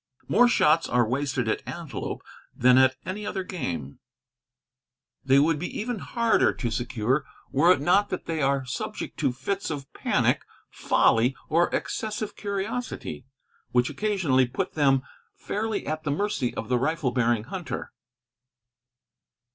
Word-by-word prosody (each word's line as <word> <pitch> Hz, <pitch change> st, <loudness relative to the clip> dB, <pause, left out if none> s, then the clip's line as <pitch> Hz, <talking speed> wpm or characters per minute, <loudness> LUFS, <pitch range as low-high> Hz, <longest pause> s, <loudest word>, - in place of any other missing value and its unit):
More 245 Hz, +1 st, +5 dB
shots 165 Hz, -8 st, +3 dB
are 120 Hz, -2 st, +3 dB
wasted 130 Hz, -1 st, -1 dB
at 110 Hz, -, 0 dB
antelope -, -, -5 dB, 0.3 s
than 125 Hz, +1 st, +5 dB
at 130 Hz, 0 st, +5 dB
any 190 Hz, +4 st, -4 dB
other 190 Hz, -2 st, -3 dB
game. 85 Hz, -, -5 dB, 1.2 s
They 135 Hz, 0 st, +4 dB
would 150 Hz, +2 st, +3 dB
be 180 Hz, -, -4 dB
even 235 Hz, 0 st, -3 dB
harder 230 Hz, +1 st, +2 dB
to 120 Hz, -3 st, -3 dB
secure 120 Hz, +3 st, 0 dB, 0.3 s
were 165 Hz, +6 st, +5 dB
it 165 Hz, -, +4 dB
not 185 Hz, +7 st, +3 dB
that 185 Hz, -, -4 dB
they 160 Hz, -2 st, -2 dB
are 135 Hz, -1 st, +1 dB
subject 125 Hz, -, -5 dB
to -, -, +2 dB
fits 190 Hz, +11 st, -3 dB
of 140 Hz, -3 st, -6 dB
panic, -, -, +1 dB, 0.3 s
folly, 120 Hz, +4 st, +3 dB
or 170 Hz, +2 st, +3 dB
excessive 215 Hz, -1 st, -3 dB
curiosity, 205 Hz, -, -4 dB, 0.5 s
which 125 Hz, 0 st, +3 dB
occasionally 175 Hz, -, +1 dB
put 125 Hz, -, -3 dB
them 135 Hz, -3 st, +3 dB, 0.3 s
fairly 215 Hz, 0 st, -3 dB
at 155 Hz, +1 st, -2 dB
the 150 Hz, -, -2 dB
mercy 145 Hz, -, 0 dB
of 110 Hz, -, -4 dB
the 125 Hz, -1 st, +1 dB
rifle 145 Hz, -1 st, 0 dB
bearing 120 Hz, -3 st, +1 dB
hunter. 175 Hz, -, -5 dB
145 Hz, 140 wpm, -26 LUFS, 125-190 Hz, 1.2 s, More